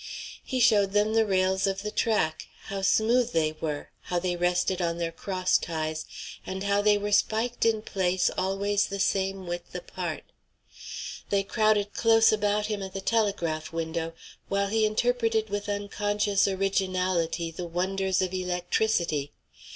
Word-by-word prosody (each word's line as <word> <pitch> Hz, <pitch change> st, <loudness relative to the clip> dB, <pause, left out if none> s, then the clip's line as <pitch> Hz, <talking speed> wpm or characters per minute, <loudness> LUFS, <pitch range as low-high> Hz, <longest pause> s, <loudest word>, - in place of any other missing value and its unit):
He 260 Hz, -, -2 dB
showed 205 Hz, -5 st, +4 dB
them 210 Hz, +1 st, +2 dB
the 225 Hz, -1 st, +3 dB
rails 190 Hz, 0 st, +2 dB
of 195 Hz, 0 st, -2 dB
the 210 Hz, -, -3 dB
track, 210 Hz, -10 st, 0 dB, 0.2 s
how 195 Hz, 0 st, -3 dB
smooth 230 Hz, +5 st, +3 dB
they 155 Hz, -1 st, +2 dB
were, 150 Hz, -2 st, -3 dB
how 180 Hz, -, -1 dB
they 175 Hz, 0 st, 0 dB
rested 180 Hz, +1 st, +1 dB
on 170 Hz, -1 st, 0 dB
their 170 Hz, -1 st, -2 dB
cross 185 Hz, +1 st, 0 dB
ties, 155 Hz, -1 st, -3 dB, 0.4 s
and 190 Hz, +1 st, -5 dB
how 200 Hz, 0 st, +2 dB
they 210 Hz, 0 st, +4 dB
were 205 Hz, 0 st, -3 dB
spiked 230 Hz, +4 st, +1 dB
in 220 Hz, -1 st, +1 dB
place 185 Hz, -3 st, +1 dB
always 195 Hz, +2 st, 0 dB
the 200 Hz, 0 st, -5 dB
same 195 Hz, -1 st, 0 dB
width 175 Hz, 0 st, -6 dB
apart. -, -, -5 dB, 1.1 s
They 200 Hz, -1 st, +2 dB
crowded 210 Hz, -1 st, +1 dB
close 225 Hz, -1 st, +5 dB
about 210 Hz, -1 st, +1 dB
him 210 Hz, -1 st, -3 dB
at 190 Hz, -1 st, -6 dB
the -, -, -2 dB
telegraph 195 Hz, -8 st, 0 dB
window 165 Hz, 0 st, -3 dB, 0.4 s
while 200 Hz, 0 st, +1 dB
he 220 Hz, 0 st, +3 dB
interpreted 225 Hz, -1 st, +1 dB
with 205 Hz, 0 st, -3 dB
unconscious 205 Hz, 0 st, 0 dB
originality 185 Hz, -4 st, 0 dB
the 175 Hz, +2 st, -6 dB
wonders 190 Hz, +2 st, 0 dB
of 185 Hz, 0 st, -3 dB
electricity. 180 Hz, -4 st, 0 dB
195 Hz, 150 wpm, -27 LUFS, 180-210 Hz, 1.1 s, close